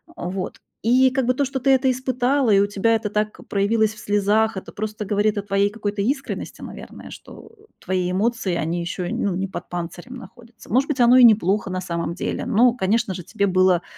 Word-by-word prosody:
А, 175 - -5
вот. 190 0 -5 0.2
И 255 +3 +4
как 265 -1 0
бы 255 - +3
то, 280 - +1
что 265 0 -3
ты 260 - 0
это 265 0 +3
испытала, 255 0 0
и 195 - +5
у 200 - +4
тебя 215 +3 +1
это 220 -2 -2
так 210 0 -2
проявилось 215 +2 +1
в 215 - -14
слезах- 205 +1 +1
это - - -8
просто 215 0 -5
говорит 205 +1 +1
о 200 - -2
твоей 200 0 +1
какой-то 205 -1 -4
искренности, 270 +6 -3
наверное, - - -10
что, - - -13
э, 420 - -23 0.2
твои 180 -1 -2
эмоции, 205 -2 0
они 170 +3 -2
ещё, 175 +1 -4
ну, 195 -3 -1
не 195 +1 -2
под 190 - -8
панцирем 175 +7 -6
находятся. 240 -2 -14
Может 265 +3 +3
быть, 280 -3 -2
оно 245 +2 +6
и 250 - +7
неплохо 205 -3 +4
на 185 0 -3
самом 170 -1 -3
деле, - - -3
но, 240 0 +4
конечно 220 -1 0
же, 180 -1 -7
тебе 200 - -1
было, 185 -2 +3
210 Hz, 215 wpm, -22 LUFS, 190-245 Hz, 0.2 s, и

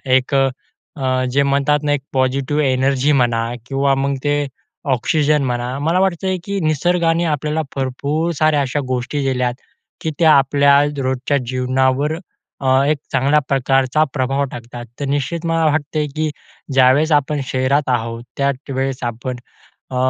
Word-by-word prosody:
एक 130 +2 +1
अ, 130 0 -2
जे 140 +2 +3
म्हणतात 140 +1 +2
ना 145 -1 +1
एक 140 - -1
पॉझिटिव्ह 135 +3 +1
एनर्जी 135 +1 +2
म्हणा 120 -4 +2 0.2
किंवा 135 0 +1
मग 135 +1 0
ते 145 0 +1 0.5
ऑक्सिजन 150 +3 +1
म्हणा. 125 +1 -2
मला 165 +5 +1
वाटतंय, 190 0 0
की 200 -1 -2
निसर्गाने 165 +2 +1
आपल्याला 150 +2 -1
भरपूर 140 +5 -1
साऱ्या 155 -2 +3
अशा 140 +2 -1
गोष्टी 130 +3 -2
दिल्यात, 125 -2 0 0.5
की 160 - -2
त्या 160 -2 +6
आपल्या 140 +1 +4 0.2
रोजच्या 130 +1 0
जीवनावर 130 +3 +1 0.5
अ, 135 - -2 0.2
एक 150 - +2
चांगल्या 140 +4 +3
प्रकारचा 135 +2 +2
प्रभाव 135 +1 0
टाकतात. 120 0 -8
तर 145 - -2
निश्चित 145 +5 -2
मला 165 -1 +1
वाटतंय, 150 0 0
की 155 0 0 0.4
ज्यावेळेस 135 +5 +4
आपण 145 0 +1
शहरात 130 +3 0
आहोत 115 -1 -1
त्या 140 0 +2 0.2
वेळेस 135 0 -2
आपण 120 +2 -4 0.5
अ, 130 - -4
140 Hz, 145 wpm, -18 LUFS, 130-150 Hz, 0.5 s, त्या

